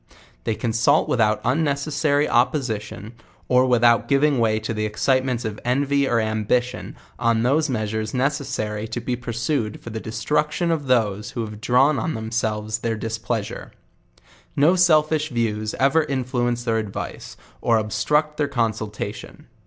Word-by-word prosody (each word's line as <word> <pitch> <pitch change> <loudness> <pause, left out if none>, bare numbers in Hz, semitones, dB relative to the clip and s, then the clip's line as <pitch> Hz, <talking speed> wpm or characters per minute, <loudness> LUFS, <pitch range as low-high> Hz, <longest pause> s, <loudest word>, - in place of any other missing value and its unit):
They 110 - 0
consult 120 +7 +2
without 110 -3 +1
unnecssary 145 +1 +1
opposition, 115 -5 -1 0.3
or 125 0 +4
without 120 -1 +4
giving 140 -1 +3
way 110 -2 +2
to 110 +1 -4
tho 105 - -3
excitements 125 +3 0
of 105 -1 -4
envy 140 +3 +1
or 120 - +2
ambition, 110 +3 -1 0.2
on 115 -1 +2
the 150 +5 +2
measures 110 -2 -2
necessary 130 -6 -2
to 110 - -4
be 125 - -2
pursued 120 -1 -2
fur 120 - -9
the 110 - -4
destruction 150 +10 -1
of 150 -4 -2
those 105 -4 +1
who - - 0
have 105 -1 -7
drawn 135 +6 +3
on 160 - -2
themselves 110 -1 -2
their 115 0 -1
displeasure. 110 0 -4 0.8
No 155 +6 +4
sel 170 -4 +5
fish 155 0 -2
views 110 -4 -2
ever 140 +4 +3
influence 125 -3 -1
their 115 -2 +1
advice, 105 -3 -6 0.2
or 115 - +3
obstruct 150 +8 0
their 145 - +1
con 120 -5 +1
sultation. 105 -1 -7
120 Hz, 145 wpm, -22 LUFS, 110-140 Hz, 0.8 s, sel